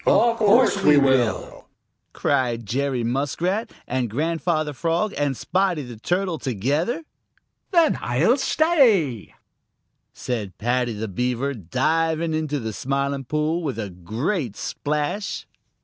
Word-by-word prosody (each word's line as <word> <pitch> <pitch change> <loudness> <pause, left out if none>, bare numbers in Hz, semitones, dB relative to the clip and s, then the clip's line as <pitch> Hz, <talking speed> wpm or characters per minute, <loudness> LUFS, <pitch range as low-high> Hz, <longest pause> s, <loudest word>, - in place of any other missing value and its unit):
"Of 235 0 +4
course 220 -1 +4
we 150 -5 +6
will!" 130 -5 +1 0.4
cried 120 -3 0
Jerry 130 +2 -1
Muskrat 145 - -1
and 125 -2 -1
Grandfather 155 - -1
Frog 170 +8 0
and 145 -3 -1
Spotty 180 -2 0
the 120 -2 -9
Turtle 175 - -1
together. 145 - -1 0.7
"Then 340 -5 +3
I'll 150 - +2
stay," 235 - +2 0.8
said 110 -7 -4
Paddy 120 +1 0
the 110 +1 -4
Beaver, 125 +7 -1
diving 160 - 0
into 155 -2 -1
the 110 -3 -4
Smiling 140 +2 -2
Pool 155 +5 0
with 145 -7 -3
a 105 -4 -4
great 110 - -3
splash. 150 +7 -3
145 Hz, 115 wpm, -23 LUFS, 120-175 Hz, 0.8 s, we